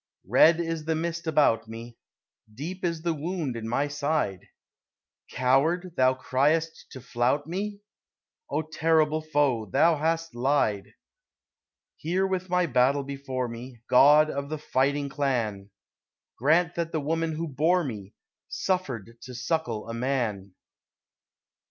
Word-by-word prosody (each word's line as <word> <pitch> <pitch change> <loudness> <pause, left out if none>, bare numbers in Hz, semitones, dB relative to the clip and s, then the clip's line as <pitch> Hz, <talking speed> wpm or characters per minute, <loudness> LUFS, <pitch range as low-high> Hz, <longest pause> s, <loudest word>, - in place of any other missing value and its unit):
Red 165 +1 +5
is 165 -2 -3
the 160 0 0
mist 170 +1 -3
about 140 -8 +3
me; 115 +1 -9 0.6
Deep 165 - -7
is 165 -2 -2
the 170 -1 +1
wound 160 -3 -3
in 115 -1 -5
my 140 +5 0
side; 145 - -2 0.8
"Coward" 155 +8 +1
thou 130 0 +3
criest 145 +6 0
to 130 - -9
flout 125 +5 0
me? 200 +5 -4 0.7
O 160 - -1
terrible 155 0 +1
Foe, 145 -8 0
thou 155 - +3
hast 165 +2 -1
lied! 120 -6 0 1.0
Here 180 +5 0
with 185 -1 -2
my 180 0 +2
battle 135 0 +2
before 135 -2 -4
me, 120 0 -9
God 150 +4 +6
of 140 0 -4
the 155 - -3
fighting 140 0 0
Clan, 120 -9 -2 0.7
Grant 165 +6 +2
that 170 -1 -3
the 160 - -1
woman 160 +2 -1
who 165 +2 -3
bore 160 +6 +2
me 105 -8 -7 0.3
Suffered 125 - -3
to 125 -1 -9
suckle 120 -4 -2
a 115 - -5
Man! 115 -7 -2
145 Hz, 135 wpm, -26 LUFS, 125-165 Hz, 1.0 s, God